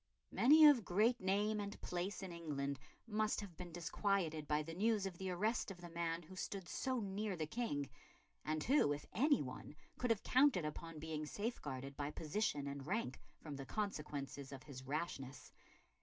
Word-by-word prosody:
Many 305 Hz, +6 st, +8 dB
of 285 Hz, -7 st, +8 dB
great 215 Hz, +7 st, +3 dB
name 205 Hz, +3 st, +2 dB
and 205 Hz, 0 st, -4 dB
place 180 Hz, +3 st, -3 dB
in 190 Hz, -, -5 dB
England 140 Hz, -5 st, -3 dB, 0.3 s
must 215 Hz, -1 st, +1 dB
have 195 Hz, -5 st, -8 dB
been 180 Hz, 0 st, -7 dB
disquieted 170 Hz, -2 st, 0 dB
by 150 Hz, 0 st, +2 dB
the 165 Hz, +2 st, -6 dB
news 210 Hz, +2 st, +2 dB
of 180 Hz, -3 st, -5 dB
the 190 Hz, -1 st, -2 dB
arrest 210 Hz, +7 st, +1 dB
of 190 Hz, -3 st, -8 dB
the 175 Hz, -1 st, -9 dB
man 170 Hz, 0 st, -1 dB
who 185 Hz, +4 st, -11 dB
stood 190 Hz, 0 st, -4 dB
so 260 Hz, -2 st, -1 dB
near 205 Hz, -1 st, -2 dB
the 160 Hz, -2 st, -1 dB
King, 155 Hz, -, -1 dB, 0.6 s
and 155 Hz, 0 st, -1 dB
who, 260 Hz, -, +4 dB
if 145 Hz, -, -6 dB
any 275 Hz, -, +4 dB
one, 130 Hz, +3 st, -7 dB, 0.2 s
could 250 Hz, -, +1 dB
have 225 Hz, -3 st, +2 dB
counted 255 Hz, -, +5 dB
upon 165 Hz, +2 st, -5 dB
being 155 Hz, 0 st, -3 dB
safeguarded 145 Hz, -, -4 dB
by 145 Hz, 0 st, -2 dB
position 150 Hz, -1 st, -1 dB
and 140 Hz, 0 st, -5 dB
rank 195 Hz, -, -1 dB, 0.2 s
from 150 Hz, -3 st, -6 dB
the 135 Hz, -, -5 dB
consequences 145 Hz, -9 st, -3 dB
of 135 Hz, -2 st, -8 dB
his 140 Hz, -4 st, -8 dB
rashness. 135 Hz, -1 st, -4 dB
175 Hz, 180 wpm, -39 LUFS, 150-210 Hz, 0.6 s, Many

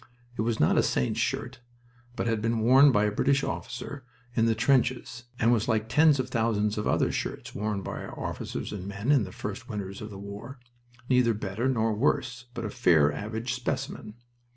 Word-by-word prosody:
It -, -, -2 dB
was 110 Hz, 0 st, 0 dB
not 75 Hz, -, +4 dB
a -, -, +6 dB
saint's 65 Hz, -, 0 dB
shirt, -, -, -2 dB, 0.6 s
but -, -, -2 dB
had 115 Hz, -2 st, 0 dB
been 115 Hz, 0 st, 0 dB
worn 135 Hz, +5 st, +7 dB
by 105 Hz, -4 st, +3 dB
a 105 Hz, -, +2 dB
British 135 Hz, +6 st, +2 dB
officer 125 Hz, +3 st, -5 dB, 0.3 s
in 115 Hz, -2 st, +2 dB
the 115 Hz, -, +2 dB
trenches, 125 Hz, 0 st, +1 dB
and 120 Hz, 0 st, +3 dB
was 115 Hz, -1 st, +1 dB
like 110 Hz, -2 st, +1 dB
tens 150 Hz, +1 st, +5 dB
of 130 Hz, -, -1 dB
thousands 110 Hz, -3 st, +1 dB
of 105 Hz, -, -2 dB
other -, -, +2 dB
shirts -, -, -4 dB
worn 105 Hz, -1 st, -2 dB
by -, -, -5 dB
our -, -, -9 dB
officers -, -, -4 dB
and 95 Hz, -2 st, -6 dB
men 100 Hz, +7 st, -1 dB
in 135 Hz, -8 st, +4 dB
the 90 Hz, -, -9 dB
first -, -, -6 dB
winters 100 Hz, -2 st, -5 dB
of 105 Hz, -, -6 dB
the 100 Hz, -, -9 dB
war, 100 Hz, +7 st, -8 dB, 0.5 s
neither 125 Hz, -3 st, +3 dB
better 105 Hz, +5 st, -2 dB
nor 115 Hz, -3 st, +1 dB
worse, 125 Hz, +1 st, 0 dB
but 115 Hz, -, -4 dB
a 105 Hz, -, -3 dB
fair 75 Hz, -7 st, +4 dB
average 110 Hz, -, -3 dB
specimen. 115 Hz, -3 st, -4 dB
115 Hz, 200 wpm, -28 LUFS, 105-125 Hz, 0.6 s, worn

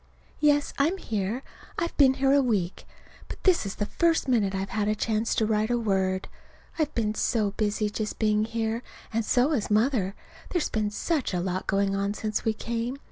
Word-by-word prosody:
Yes, 290 Hz, -1 st, +3 dB
I'm 325 Hz, +7 st, +2 dB
here. 220 Hz, -, -2 dB, 0.3 s
I've 335 Hz, 0 st, -2 dB
been 265 Hz, -2 st, +5 dB
here 270 Hz, +1 st, +3 dB
a 285 Hz, -, +5 dB
week. 205 Hz, -8 st, -1 dB, 0.4 s
But -, -, -9 dB
this 360 Hz, -, +3 dB
is 195 Hz, -, -5 dB
the 205 Hz, -, -1 dB
first 330 Hz, +6 st, +1 dB
minute 210 Hz, -6 st, +2 dB
I've 195 Hz, +1 st, -3 dB
had 210 Hz, 0 st, 0 dB
a 215 Hz, -, +2 dB
chance 220 Hz, +1 st, 0 dB
to 220 Hz, -, +2 dB
write 215 Hz, 0 st, +1 dB
a 240 Hz, -, +2 dB
word. 190 Hz, -4 st, 0 dB, 0.5 s
I've 305 Hz, -1 st, +1 dB
been 215 Hz, -2 st, 0 dB
so 215 Hz, -2 st, +1 dB
busy 210 Hz, +1 st, 0 dB
just 210 Hz, +1 st, -3 dB
being 215 Hz, -1 st, +2 dB
here. 225 Hz, 0 st, -2 dB, 0.3 s
And 230 Hz, +1 st, +1 dB
so 250 Hz, +6 st, +2 dB
has 245 Hz, -9 st, 0 dB
Mother. 210 Hz, -3 st, +2 dB, 0.3 s
There's 350 Hz, -4 st, 0 dB
been 215 Hz, -1 st, 0 dB
such 265 Hz, -, -1 dB
a -, -, +1 dB
lot 185 Hz, +1 st, -2 dB
going 195 Hz, 0 st, +1 dB
on 200 Hz, +1 st, -1 dB
since 215 Hz, -1 st, -2 dB
we 220 Hz, -, +1 dB
came. 235 Hz, +4 st, -3 dB
220 Hz, 195 wpm, -27 LUFS, 205-255 Hz, 0.5 s, been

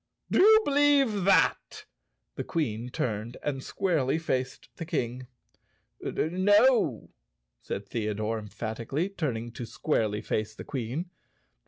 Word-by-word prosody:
"Do -, -, +3 dB
you 435 Hz, +3 st, +8 dB
believe 280 Hz, -8 st, +3 dB
that?" 195 Hz, -, +2 dB, 0.5 s
The -, -, -4 dB
Queen 125 Hz, -8 st, -2 dB
turned 115 Hz, -1 st, -3 dB
and 135 Hz, -2 st, -2 dB
squarely 160 Hz, -8 st, 0 dB
faced 130 Hz, -5 st, -3 dB
the -, -, -4 dB
King. 125 Hz, -5 st, -3 dB, 0.7 s
"No!" 205 Hz, +9 st, +2 dB, 0.5 s
said 100 Hz, -, -5 dB
Theodore 110 Hz, 0 st, -2 dB
emphatically, 115 Hz, -, -3 dB
turning 120 Hz, -, -3 dB
to 120 Hz, -, -7 dB
squarely 110 Hz, -8 st, -1 dB
face 110 Hz, 0 st, -2 dB
the -, -, -8 dB
Queen. 135 Hz, +7 st, -4 dB
130 Hz, 115 wpm, -28 LUFS, 115-185 Hz, 0.7 s, you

